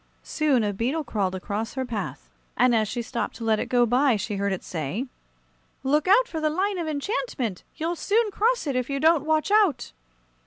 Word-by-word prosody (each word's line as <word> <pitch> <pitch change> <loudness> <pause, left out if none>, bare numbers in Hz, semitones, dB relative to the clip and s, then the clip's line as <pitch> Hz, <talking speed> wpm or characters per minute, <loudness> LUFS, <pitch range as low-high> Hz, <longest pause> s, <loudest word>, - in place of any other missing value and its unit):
Soon 290 -7 +1
a 205 -1 0
beetle 255 +10 -1
crawled 200 -7 -1
across 205 +5 -4
her 260 -1 -2
path, 230 -4 -5 0.3
and 250 0 +4
as 220 -2 +2
she 240 +3 -3
stopped 235 +1 -3
to 230 - -8
let 220 -1 +2
it - - -2
go 245 -1 +3
by, 250 +2 +3
she 205 0 -3
heard 200 0 0
it 190 - -3
say: 165 - -3 0.8
"Look 290 +4 +1
out 470 +6 +5
for 320 -7 -5
the 310 - +2
line 380 +4 -1
of 335 - -3
enchantment! 285 - -3
You'll 330 +2 -2
soon 425 +5 +1
cross 465 +1 +1
it, 280 -3 -2
if 255 +1 -1
you 275 0 -1
don't 315 -1 +4
watch 315 +4 +1
out." 395 - +3
265 Hz, 205 wpm, -25 LUFS, 225-325 Hz, 0.8 s, out